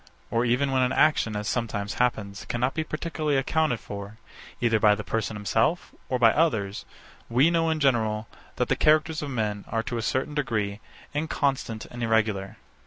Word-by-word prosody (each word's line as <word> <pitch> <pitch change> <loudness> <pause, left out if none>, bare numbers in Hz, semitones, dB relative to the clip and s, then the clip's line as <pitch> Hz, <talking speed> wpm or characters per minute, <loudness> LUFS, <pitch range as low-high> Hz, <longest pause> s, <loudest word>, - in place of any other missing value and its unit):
Or 115 +1 +2
even 130 +3 +2
when 130 -1 +2
an 125 0 +2
action, 150 -8 +3
as 105 0 -3
sometimes 110 -4 -2
happens, 100 -5 -1
cannot 125 +3 -1
be 160 - -1
particularly 155 -2 -2
accounted 135 -2 +1
for, 100 +1 -8 0.4
either 115 -2 +2
by 105 -1 +5
the 105 - -6
person 110 -1 -2
himself 110 - 0 0.2
or 130 - +1
by 115 -2 +6
others; 110 -11 0 0.4
we 130 +8 +4
know, 165 -1 +2
in 160 -1 0
general, 110 -6 +1 0.3
that - - 0
the - - +2
characters 155 0 +3
of 145 - -4
men 105 -5 -2
are, 115 0 -1
to 120 0 -3
a - - -2
certain 130 +6 -1
degree, 110 -8 -1 0.3
inconstant 140 -6 -1
and 120 - -7
irregular. 110 -4 0
120 Hz, 175 wpm, -26 LUFS, 110-145 Hz, 0.4 s, by